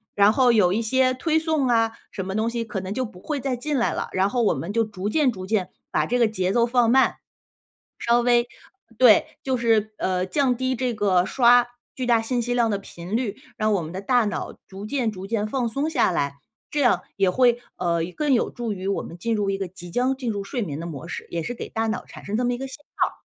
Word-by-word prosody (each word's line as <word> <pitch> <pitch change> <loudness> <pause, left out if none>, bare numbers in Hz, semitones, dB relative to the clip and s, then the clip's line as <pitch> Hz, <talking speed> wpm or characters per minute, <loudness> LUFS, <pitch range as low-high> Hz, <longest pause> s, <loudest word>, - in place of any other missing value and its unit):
然 205 +1 +5
后 255 -1 +4
有 195 -6 +4
一 220 - +1
些 255 +3 +2
推 315 +5 0
送 315 -4 +1
啊 225 -2 +3 0.2
什 190 - -5
么 190 +1 -4
东 220 +2 +1
西 235 0 -2
可 210 -3 -4
能 185 0 -6
就 255 +3 -1
不 185 -5 -12
会 295 +4 -3
再 265 -1 -1
进 285 +4 -2
来 235 - +1
了， - - -3
然 190 +1 +2
后 245 +3 0
我 215 - +3
们 180 +5 -5
就 230 +1 +3
逐 205 -3 -5
渐 285 +2 +3
逐 185 -4 -7
渐 195 -2 0 0.2
把 155 - +1
这 245 - +1
个 235 - +5
节 190 -4 -1
奏 235 +3 +3
放 240 -1 +3
慢。 265 +2 +4 1.0
稍 - - -2
微 240 0 +3 0.5
对， 235 -3 +6 0.2
就 260 -1 0
是， 225 -3 +2
呃， 185 -1 0
降 255 +5 +1
低 260 +1 -1
这 250 -1 -1
个 195 -4 +2
刷 245 -1 +5 0.3
巨 255 - -3
大 235 -2 +3
信 245 +2 -1
息 245 +1 -1
量 235 -2 +2
的 200 - 0
频 185 +1 -5
率， 235 -5 -2 0.2
让 215 0 +1
我 195 -4 +1
们 155 - -6
的 185 - -4
大 245 +4 +2
脑 205 - -4
逐 195 +2 -8
渐 250 -2 0
逐 190 -2 -8
渐 215 0 -1
放 245 +1 -1
松 275 +7 -1
下 255 - +2
来， 140 -4 -1 0.3
这 295 - -2
样 250 -4 +4 0.2
也 195 -2 +3
会， 240 +4 +3 0.2
呃， 170 -2 0 0.2
更 295 -2 +1
有 240 - +2
助 235 -3 -4
于 190 -1 -6
我 195 - 0
们 170 - -10
进 230 +6 -1
入 205 -2 0
一 195 - -1
个， 195 - -2
即 175 -1 -11
将 255 +7 +1
进 255 -3 -3
入 200 -2 -3
睡 235 +5 -3
眠 150 -8 -4
的 165 - -5
模 165 0 -7
式， - - -6
也 170 - -2
是 245 - -4
给 - - -7
大 225 0 -2
脑 220 +2 -2
产 - - -12
生 205 - -2
这 245 - 0
么 245 0 +1
一 - - -5
个 270 +1 -5
信 265 - -8 0.2
号。 - - -1
225 Hz, 275 characters per minute, -24 LUFS, 195-250 Hz, 1.0 s, 对